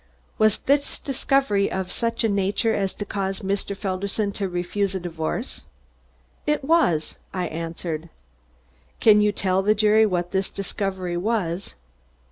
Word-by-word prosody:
"Was 215 -1 +4
this 285 +1 +1
discovery 270 -6 +1
of 190 -1 -3
such 230 -1 -1
a - - +4
nature 200 +2 +1
as 195 -3 -1
to 205 - -4
cause 195 -1 -2
Mr. 200 0 -2
Felderson 200 +2 -1
to 200 -1 -2
refuse 180 +3 -1
a - - -1
divorce?" 170 +7 -3 0.9
"It 300 -1 +1
was!" 270 - +2 0.2
I 180 -1 0
answered. 165 0 -4 0.9
"Can 210 -2 +6
you 210 0 +4
tell 190 -1 +1
the 210 +2 +3
jury 215 +1 +5
what 175 -2 -1
this 190 0 0
discovery 190 -2 -3
was?" 195 -2 -1
195 Hz, 140 wpm, -24 LUFS, 180-215 Hz, 0.9 s, Can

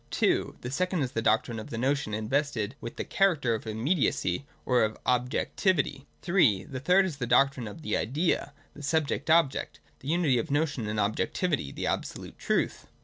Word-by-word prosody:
(2) - - +1
The 125 - -5
second 180 +2 0
is 125 - -3
the 115 - -1
doctrine 115 +1 +1
of 110 - -8
the 115 - -5
notion 135 -1 0
invested 115 0 -1
with 115 - -6
the - - -4
cliaracter 155 - +2
of 110 - -7
imniedi.u 120 +10 +1
v, 90 +10 -2 0.2
or 125 -4 +3
K>{ 110 - -14
Objootivity. 135 - 0 0.2
(,3") 165 - +3
The 130 - -4
thiitl 180 +6 +5
is 175 -7 -3
the 125 - -3
doctrine 125 0 +3
o^ 105 - -9
the 155 - -2
Idea, 145 +2 0 0.2
the 145 - -11
subject 145 -1 0
ohject, 160 -4 +2 0.2
the 135 - -11
unity 155 -6 +2
ol" 155 - -3
notion 145 -5 0
and 105 0 -2
ob 105 +1 +1
jectivity, 145 - -1
the - - -4
absohite - - -3
truth. - - -1
135 Hz, 190 wpm, -28 LUFS, 115-155 Hz, 0.2 s, thiitl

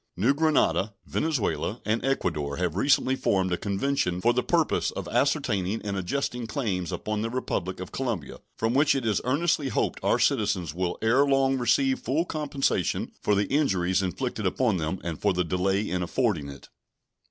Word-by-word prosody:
New 115 +10 +3
Granada, 145 -9 +2
Venezuela, 155 -9 -1
and 110 +3 0
Ecuador 80 - -1
have 90 -2 -1
recently 135 +4 +3
formed 95 -7 +1
a - - +3
convention 100 -1 -1
for 120 +5 +3
the 125 - +1
purpose - - +1
of - - -6
ascertaining 100 +2 +1
and 100 -1 -3
adjusting 120 +5 -2
claims 100 - -2
upon 105 +4 -3
the 115 - -2
Republic 95 -7 -3
of 95 - -7
Colombia, 115 - -3 0.2
from 115 +1 0
which 145 +2 +4
it 135 -3 -2
is 105 -4 +1
earnestly 145 +2 +1
hoped - - -1
our - - +3
citizens 85 -5 +1
will 90 0 -2
ere 120 +5 +4
long 135 -1 +3
receive 130 +2 +2
full 150 +8 0
compensation 140 - -1
for 105 - +2
the 100 +1 +2
injuries 95 -11 +2
inflicted 100 +3 -2
upon 110 +1 +1
them 80 +3 -2
and 85 -3 -5
for 100 -2 +2
the 90 0 +1
delay 95 +4 0
in 90 0 -1
affording 90 - 0
it. 70 0 -11
105 Hz, 175 wpm, -26 LUFS, 90-135 Hz, 0.2 s, which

